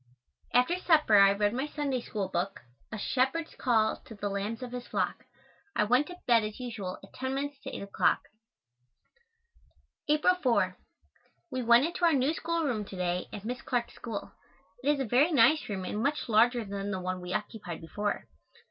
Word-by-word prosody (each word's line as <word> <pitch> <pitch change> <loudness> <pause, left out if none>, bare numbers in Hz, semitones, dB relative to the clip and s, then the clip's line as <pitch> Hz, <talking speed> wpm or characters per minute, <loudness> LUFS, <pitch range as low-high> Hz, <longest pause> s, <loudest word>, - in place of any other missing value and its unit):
After 250 +9 +3
supper 305 - +5
I 195 0 +7
read 205 +1 +1
my 265 +4 -1
Sunday 280 -4 -2
School 205 -4 -3
book, 190 +2 -3 0.3
"A 215 - -4
Shepherd's 265 +9 0
Call 220 -4 +2
to 225 - -10
the 205 0 -3
Lambs 205 +5 -3
of 245 - -6
his 245 -1 -6
Flock." - - -2 0.5
I - - +3
went 250 +7 +3
to 360 - -9
bed 235 -2 +5
as 215 +2 -5
usual 220 -7 -5
at 195 - -15
ten 260 +1 -3
minutes 285 0 -3
to - - -6
8 - - -6
o'clock. 200 - +2 1.9
April 305 +4 +4
4. 250 -4 +2 0.8
We 255 -1 -2
went 235 +3 +6
into 345 +2 -4
our 335 -2 +6
new 275 +2 +2
schoolroom 325 -10 -1
to 195 - -9
day 180 0 -1
at 205 0 -8
Miss 250 +3 -4
Clark's 245 -5 -2
school. 225 -4 -6 0.5
It 280 - +1
is 295 -1 +3
a 270 - 0
very 260 +9 +3
nice 285 +1 +4
room 190 -3 -3
and 210 - -3
much 290 +4 0
larger 235 +1 +4
than 200 0 -4
the 190 -2 -2
one 185 0 -3
we 180 0 -6
occupied 205 -4 -4
before. 205 +5 -3
235 Hz, 185 wpm, -30 LUFS, 205-275 Hz, 1.9 s, I